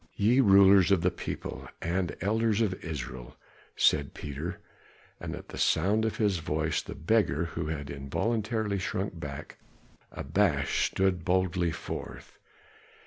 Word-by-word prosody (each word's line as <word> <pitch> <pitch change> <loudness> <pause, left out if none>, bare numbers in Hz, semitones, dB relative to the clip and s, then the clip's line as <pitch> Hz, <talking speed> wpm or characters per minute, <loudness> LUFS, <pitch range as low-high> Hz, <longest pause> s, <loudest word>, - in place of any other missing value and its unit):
"Ye 115 +6 +3
rulers 100 -4 +7
of 100 -4 +3
the 90 +1 +2
people, 85 - -6
and 85 0 -2
elders 110 +2 +1
of 110 -5 +2
Israel," 65 -6 -6 0.4
said - - +2
Peter, 75 +4 -5 0.6
and - - -5
at - - -11
the - - -7
sound 100 +7 +2
of 110 - -2
his 100 -5 +1
voice 80 0 -1
the - - -8
beggar 85 -3 +1
who 85 -1 -4
had 75 -3 -4
involuntarily 105 - -1
shrunken 95 -1 -3
back 70 -3 -7 0.5
abashed 75 -2 0
stood 95 -3 +1
boldly 90 -1 +1
forth. - - -7
90 Hz, 135 wpm, -29 LUFS, 80-100 Hz, 0.6 s, rulers